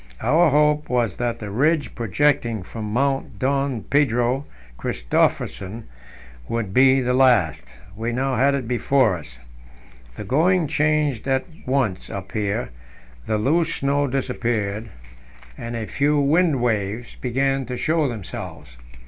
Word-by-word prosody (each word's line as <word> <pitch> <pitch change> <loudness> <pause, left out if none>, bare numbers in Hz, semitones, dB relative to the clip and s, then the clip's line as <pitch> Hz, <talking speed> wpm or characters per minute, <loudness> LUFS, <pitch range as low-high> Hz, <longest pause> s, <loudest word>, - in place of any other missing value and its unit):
Our 165 +1 +4
hope 150 +1 +2
was 120 -5 0
that 120 -1 -1
the 105 -3 -7
ridge 145 +2 +1
projecting 120 -1 0
from 105 +2 -6
Mount 135 +3 -1
Don 135 -3 0
Pedro 130 -1 +1 0.3
Christophersen 95 - -1 0.7
would 115 -5 -2
be 130 +2 +5
the 125 0 0
last; 105 - +2 0.2
we 115 +2 -3
now 130 +2 -1
had 140 +3 +3
it 130 -4 -3
before 125 -3 +2
us. 75 -7 -10 0.8
The - - -6
going 170 +6 +2
changed 150 -4 0
at 130 -1 +1 0.2
once 125 -8 0
up 95 -1 -7
here; 105 - -2 0.6
the 110 - +1
loose 160 +9 +1
snow 140 +1 +1
disappeared, 115 -5 -2 0.7
and 115 - -6
a 115 -1 -3
few 145 +5 +1
wind 145 -2 +2
waves 110 0 -1
(sastrugi) - - -17
began 135 +2 0
to 125 0 -4
show 155 +1 +1
themselves. 100 - -7
125 Hz, 135 wpm, -22 LUFS, 110-140 Hz, 0.8 s, be